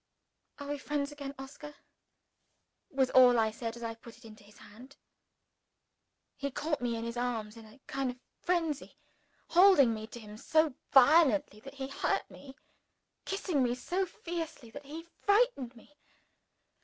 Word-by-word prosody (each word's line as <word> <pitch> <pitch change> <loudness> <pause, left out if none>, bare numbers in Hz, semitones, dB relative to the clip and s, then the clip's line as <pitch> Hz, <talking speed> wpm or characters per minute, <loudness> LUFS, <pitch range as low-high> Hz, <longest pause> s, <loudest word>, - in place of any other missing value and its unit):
"Are 285 - -8
we 290 0 -3
friends 290 0 -2
again, 280 -1 -7
Oscar?" 285 +2 -10 1.1
was 265 -2 +1
all 250 -2 +7
I 220 -1 +2
said 230 +1 -5
as 235 - -9
I 230 0 -3
put 230 0 -14
it 240 - -18
into 215 -1 -13
his 205 +1 -19
hand. 255 +6 -14 1.4
He 280 - -3
caught 295 +2 -2
me 240 -1 -1
in 225 - -4
his 235 +1 -5
arms 230 -3 -2
in 225 -1 -12
a 215 +6 -18
kind 270 -1 -2
of 250 0 -7 0.2
frenzy 330 -5 -1 0.5
holding 345 -9 +6
me 220 0 -6
to 235 - -10
him 210 -1 -11
so 315 +4 +2 0.2
violently 290 -3 +5
that 275 +5 -12
he 270 -1 -4
hurt 275 - -1
me; 275 -1 -12 0.7
kissing 380 -7 -1
me 245 -1 +1
so 365 +9 -2
fiercely 325 -9 -6
that 285 +4 -10
he 310 +4 -8
frightened 405 - +1
me. 240 +6 -18
270 Hz, 160 wpm, -31 LUFS, 235-295 Hz, 1.4 s, all